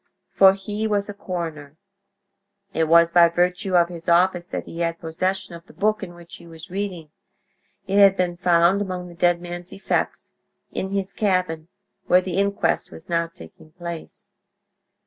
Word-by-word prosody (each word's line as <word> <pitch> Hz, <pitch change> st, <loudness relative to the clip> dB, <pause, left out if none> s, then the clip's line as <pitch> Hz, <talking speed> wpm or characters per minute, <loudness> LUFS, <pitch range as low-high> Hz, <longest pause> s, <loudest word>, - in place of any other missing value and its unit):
For 195 Hz, 0 st, +6 dB
he 205 Hz, +3 st, -3 dB
was 205 Hz, -1 st, -1 dB
a -, -, -4 dB
coroner. 165 Hz, -7 st, -6 dB, 1.0 s
It 160 Hz, -, +1 dB
was 170 Hz, +1 st, +5 dB
by 170 Hz, -1 st, +6 dB
virtue 180 Hz, +2 st, 0 dB
of 170 Hz, -1 st, +5 dB
his 170 Hz, -1 st, -6 dB
office 175 Hz, 0 st, +3 dB
that -, -, -4 dB
he 165 Hz, -, -9 dB
had 165 Hz, -1 st, -1 dB
possession 185 Hz, +3 st, -2 dB
of 170 Hz, +2 st, -11 dB
the -, -, -16 dB
book 215 Hz, +1 st, +1 dB
in 175 Hz, -3 st, -7 dB
which 170 Hz, 0 st, -12 dB
he 170 Hz, -, -15 dB
was 165 Hz, +2 st, -12 dB
reading; 185 Hz, -6 st, -4 dB, 0.7 s
it 200 Hz, +1 st, +1 dB
had 195 Hz, -1 st, +7 dB
been 180 Hz, -1 st, 0 dB
found 175 Hz, +2 st, +3 dB
among 180 Hz, -2 st, -4 dB
the -, -, -11 dB
dead 175 Hz, 0 st, +2 dB
man's 175 Hz, 0 st, -7 dB
effects—in 190 Hz, -1 st, -4 dB
his 195 Hz, -1 st, -3 dB
cabin, 185 Hz, -6 st, 0 dB, 0.4 s
where 180 Hz, -, +6 dB
the 185 Hz, -1 st, -4 dB
inquest 200 Hz, 0 st, 0 dB
was 165 Hz, +3 st, -13 dB
now 170 Hz, 0 st, +1 dB
taking 165 Hz, -1 st, -16 dB
place. 170 Hz, -1 st, -8 dB
175 Hz, 165 wpm, -23 LUFS, 170-190 Hz, 1.0 s, had